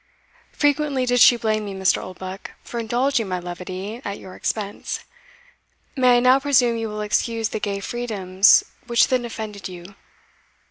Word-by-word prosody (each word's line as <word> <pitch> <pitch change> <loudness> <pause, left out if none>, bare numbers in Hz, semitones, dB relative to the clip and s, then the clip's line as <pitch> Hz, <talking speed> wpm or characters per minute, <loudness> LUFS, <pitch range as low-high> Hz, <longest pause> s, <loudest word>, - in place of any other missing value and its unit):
Frequently 290 -2 +1
did 245 0 +2
she 240 0 +7
blame 215 -2 -1
me, 200 -1 -6
Mr. 190 0 +2
Oldbuck, 185 +1 -8
for 235 - -6
indulging 240 +1 0
my 185 -1 -2
levity 185 +5 -6
at 200 0 -4
your 185 - -11
expense 205 -2 -4 0.9
may 250 -2 +5
I - - +4
now 255 +2 +5
presume 260 -4 +3
you 225 -1 -3
will 210 0 -5
excuse 225 +1 0
the - - -4
gay 200 -1 -2
freedoms 200 -4 +3 0.2
which 235 -1 +3
then 255 -2 +1
offended 215 -4 -6
you? 180 +1 -11
220 Hz, 155 wpm, -22 LUFS, 195-245 Hz, 0.9 s, she